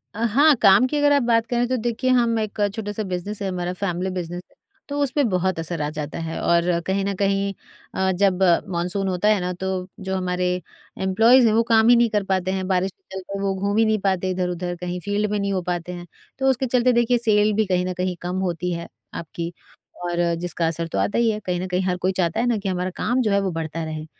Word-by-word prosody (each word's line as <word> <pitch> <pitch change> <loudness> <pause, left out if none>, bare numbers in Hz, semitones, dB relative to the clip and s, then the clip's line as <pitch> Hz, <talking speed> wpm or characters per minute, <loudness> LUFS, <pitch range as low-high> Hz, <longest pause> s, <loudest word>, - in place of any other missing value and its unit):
अ, 225 - -3
हाँ 280 +7 +5
काम 195 +6 +6
की 295 - -2
अगर 290 0 +3
आप 285 - +4
बात 230 -1 +2
करें 245 0 0
तो 255 - 0
देखिए 240 +2 -1
हम 235 -2 +3
एक 215 0 -4 0.2
छोटा-सा 210 -1 -4
बिज़नेस 195 +2 -4
है 195 - -1
हमारा 180 0 -3
फैमिली 180 -1 -2
बिज़नेस 175 -1 -5
है। - - -29 0.3
तो 285 0 -3
उसपे 280 +1 +1
बहुत 185 -1 0
असर 165 -1 -3
आ 150 - -1
जाता 150 0 -5
है 160 - -4
और 170 0 +2
कहीं 195 +1 0
न 200 - -1
कहीं 195 0 0 0.4
अ, 190 0 +1
जब 190 0 +2 0.3
मानसून 180 +3 -1
होता 185 +2 0
है 210 - +3
ना, 180 - -2
तो 185 0 -3
जो 190 0 -3
हमारे 180 -1 -1 0.6
एम्प्लॉइज़ 225 +6 +5
हैं, 215 - +3
वो 230 - +4
काम 225 0 +4
ही 245 - +8
नहीं 235 0 +4
कर 210 -2 0
पाते 185 -1 0
हैं, 190 -1 -2
बारिश 190 0 +1
के - - -49
चलते 195 +1 -6
वो 195 -1 0
घूम 200 +2 -1
ही 225 - +5
नहीं 215 -1 +1
पाते 190 -1 +1
इधर-उधर, 180 -1 -2
कहीं 180 0 -3
फील्ड 205 +1 0
में 210 - 0
नहीं 200 0 -1
हो 185 - 0
पाते 175 0 -3
हैं। 175 0 -8 0.3
तो 265 0 +3
उसके 265 0 +1
चलते 250 0 +3
देखिए 240 +1 +3
सेल 215 -2 +3
भी 220 +1 +2
कहीं 180 -1 0
न 185 - -2
कही 185 0 -1
कम 180 +1 -3
होती 175 +1 -2
है 170 0 -5 0.3
आपकी 170 +1 -5 0.5
और 175 0 -2 0.2
जिसका 170 -1 -2
असर 165 0 -2
तो - - -4
आता 205 - 0
ही 235 -1 +3
है, 210 - -3
कहीं 180 -1 -1
न 185 - -3
कहीं 180 +1 0
हर 180 -1 0
कोई 185 +1 0
चाहता 170 0 0
है 240 - +1
ना 235 - +2
कि 200 -1 -3
हमारा 180 0 -1
काम 245 +3 0
जो 215 -4 +1
है 200 - +3
वो 190 - -1
बढ़ता 165 0 -4
रहे। 155 -1 -5
190 Hz, 250 wpm, -22 LUFS, 180-220 Hz, 0.6 s, ही